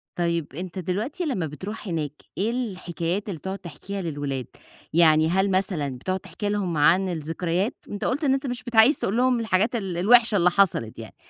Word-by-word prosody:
طيب 170 -4 -1
أنت 180 +2 -5
دلوقتي 210 - -3
لمّا 240 - -1
بتروح 190 +8 -7
هناك، 155 -5 -2 0.3
إيه 215 +4 +1
الحكايات 185 -5 -3
اللي 180 - -4
بتقعد 190 +3 -5
تحكيها 185 +3 -7
للولاد؟ 145 -6 -3 0.5
يعني 160 -1 +5
هل 190 +3 +2
مثلًا 185 -6 0
بتقعد 185 +8 -2
تحكي 195 +3 -5
لهم 190 -6 -1
عن 180 +6 +4
الذكريات؟ 170 +5 -2 0.2
أنت 205 - -4
قلُت 285 +5 -1
أنت 270 -1 +1
مش 245 0 -4
بت 240 -2 -7
عايز 225 +7 +6
تقول 205 - -1
لهم 250 -1 +3
الحاجات 220 +1 +1
ال-الوحشة 215 +3 +4
اللي 180 0 +4
حصلت 170 - +1
يعني، 110 - -9
185 Hz, 175 wpm, -25 LUFS, 165-215 Hz, 0.5 s, عايز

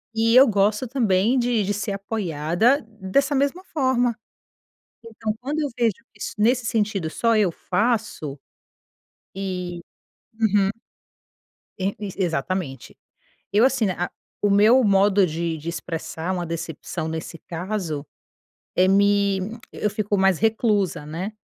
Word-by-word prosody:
e 230 +1 +3
eu 270 - +9
gosto 210 +3 +2
também 225 -1 +2
de 240 -3 +1
de 205 - 0
ser 205 0 -3
apoiada 195 - +1
dessa 220 +7 0
mesma 280 +7 +1
forma. 250 -5 +1 0.9
Então 220 -1 -4
quando 290 +5 -3
eu 290 - 0
vejo 230 -3 +3 0.2
que - - -20
isso, - - -4
nesse 240 +3 +3
sentido 205 -7 0
só 230 +3 +2
eu 195 -5 +3
faço, 205 - -1 1.0
e 180 -3 -4 0.6
uhum. 205 -3 +3 1.2
É, 195 +2 -1
isso 200 -3 -6
exatamente. 165 -4 -2 0.6
Eu, 215 +4 +5
assim, 260 -4 +1
né, 185 - +1
a 175 - -1 0.3
o 205 - +3
meu 220 +5 +5
modo 200 -1 +4
de 165 0 -2
de 155 +2 -7
expressar 165 +1 -4
uma 175 -2 -2
decepção 165 0 -5
nesse 160 +1 -5
caso 170 -4 -3 0.7
é 185 +1 +4
me 200 0 +3 0.3
eu 210 - -1
fico 205 0 -1
mais 190 -3 +3
reclusa, 215 -6 +1
né? 175 +7 -4
200 Hz, 135 wpm, -23 LUFS, 180-225 Hz, 1.2 s, eu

